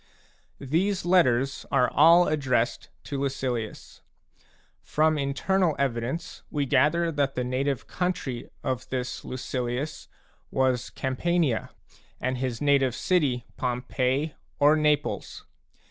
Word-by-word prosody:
These 175 +8 0
letters 135 -7 +3
are 125 -2 +4
all 170 +4 +6
addressed 130 -5 0
to 140 - -4
Lucilius. 125 -5 -3 0.8
From 155 +1 +2
internal 160 +5 +1
evidence 140 +6 -2
we 145 -2 -1
gather 160 +6 +3
that 140 -2 0
the 125 - -1
native 130 +2 -1
country 180 -9 -3
of 130 -1 -3
this 130 -1 -3
Lucilius 130 +2 -4 0.4
was 130 -2 +1
Campania, 135 -1 0 0.5
and 130 0 -2
his 125 -3 -2
native 140 -4 +3
city 140 -10 +1
Pompeii 130 +4 -1 0.2
or 145 +2 +5
Naples. 150 -1 0
140 Hz, 105 wpm, -26 LUFS, 125-155 Hz, 0.8 s, all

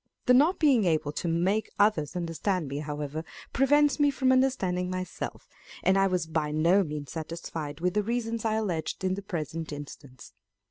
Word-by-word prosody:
The 250 - +5
not 300 +9 +5
being 270 - +4
able 155 -3 +1
to 170 - -4
make 180 +6 +1
others 190 -7 +2
understand 175 0 -1
me, 140 +2 -4
however, 150 +1 -4 0.3
prevents 290 +3 +3
me 290 0 +5
from 265 -1 +2
understanding 195 -9 +1
myself, 185 0 -5 0.4
and 190 - +4
I 195 0 +4
was 180 -3 0
by 160 -2 -1
no 170 +6 +3
means 150 -3 -6
satisfied 160 -2 -6
with 180 0 +1
the 210 - +2
reasons 230 +1 -2
I 220 -1 +1
alleged 185 -7 -2
in 185 0 +1
the 200 - -4
present 165 -4 -4
instance. 140 -3 -10
180 Hz, 175 wpm, -28 LUFS, 155-220 Hz, 0.4 s, The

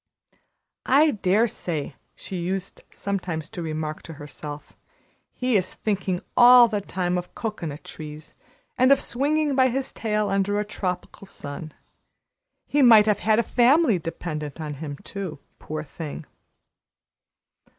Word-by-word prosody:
"I 295 +4 +5
dare 210 +1 +2
say," 160 - -3 0.2
she 190 - -6
used 185 +2 -3
sometimes 180 -6 -4
to 175 - -6
remark 155 -1 -4
to 165 - -10
herself, 145 0 -9 0.6
"he 250 -2 -1
is 185 -2 +1
thinking 190 -4 -2
all 245 0 +9
the 210 -2 -2
time 180 -2 -1
of 175 - -10
cocoanut 170 -10 -5
trees 150 -1 -9 0.5
and 255 +2 +5
of 275 - +6
swinging 295 +3 +1
by 260 -1 +4
his 265 +2 -2
tail 210 -2 -1
under 200 +1 +1
a 210 - -1
tropical 190 -1 -5
sun. 155 -1 -8 0.9
He 290 - +1
might 225 -5 +8
have 210 -2 +2
had 215 0 +2
a 235 - +3
family 245 - +4
dependent 155 -2 -5
on 150 -2 -4
him 145 -3 -5
too, 190 -6 -6 0.2
poor 155 0 -5
thing!" 155 +1 -7
190 Hz, 140 wpm, -24 LUFS, 160-230 Hz, 0.9 s, all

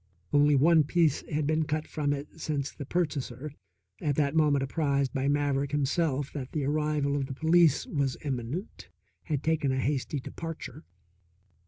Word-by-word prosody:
Only 145 0 +5
one 160 +3 +5
piece 155 -1 +2
had 150 -1 0
been 155 +1 +1
cut 155 +1 -2
from 145 -2 -1
it 145 +3 -5
since 145 -3 -2
the 140 - -8
purchaser, 150 -5 -2 0.5
at 145 -2 0
that 140 -1 +1
moment 150 -3 +3
apprised 140 -2 0
by 135 0 0
Maverick 140 -1 +1
himself 145 -1 0
that 135 -4 -6
the 150 -3 -1
arrival 150 -1 0
of 140 -2 -1
the 135 - -6
police 160 0 +4
was 140 -4 -1
imminent, 135 - -4 0.4
had 150 -4 -2
taken 160 -4 +1
a 130 - 0
hasty 140 +1 -1
departure. 165 - -7
145 Hz, 160 wpm, -29 LUFS, 140-155 Hz, 0.5 s, Only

